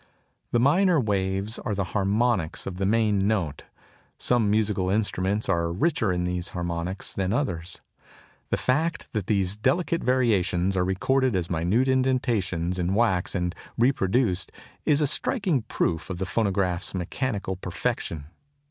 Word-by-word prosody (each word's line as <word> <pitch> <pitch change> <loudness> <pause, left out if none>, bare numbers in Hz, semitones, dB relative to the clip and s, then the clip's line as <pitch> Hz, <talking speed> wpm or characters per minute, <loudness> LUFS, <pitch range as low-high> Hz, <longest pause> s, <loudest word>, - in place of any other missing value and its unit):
The 120 - +2
minor 165 +6 +4
waves 100 -1 -1
are 105 - -3
the 100 - 0
harmonics 100 -3 +1
of 90 -2 -5
the 95 0 0
main 105 -2 +2
note. 90 -10 -1 0.5
Some 120 -4 +2
musical 105 -3 +1
instruments 100 0 0
are 85 0 +1
richer 115 - +1
in 90 -1 -1
these 90 0 -2
harmonics 85 +2 -3
than 95 -1 -1
others. 95 - -2 0.7
The - - +1
fact 160 +6 -1
that 105 -5 -2
these 100 -3 +1
delicate 170 +9 0
variations 100 -7 +2
are 90 - +2
recorded 125 +6 +1
as 90 -1 -2
minute 90 +10 +1
indentations 115 -10 0
in 85 - 0
the 95 - 0
wax 100 -5 +1
and 90 -1 -1 0.2
reproduced 115 -5 +2 0.3
is 150 0 +3
a - - +4
striking 160 - +1
proof 85 -6 -2
of 90 - -4
the 95 - -2
phonograph's 95 -4 0
mechanical 100 +2 -2
perfection. 90 -4 -3
100 Hz, 145 wpm, -26 LUFS, 90-120 Hz, 0.7 s, minor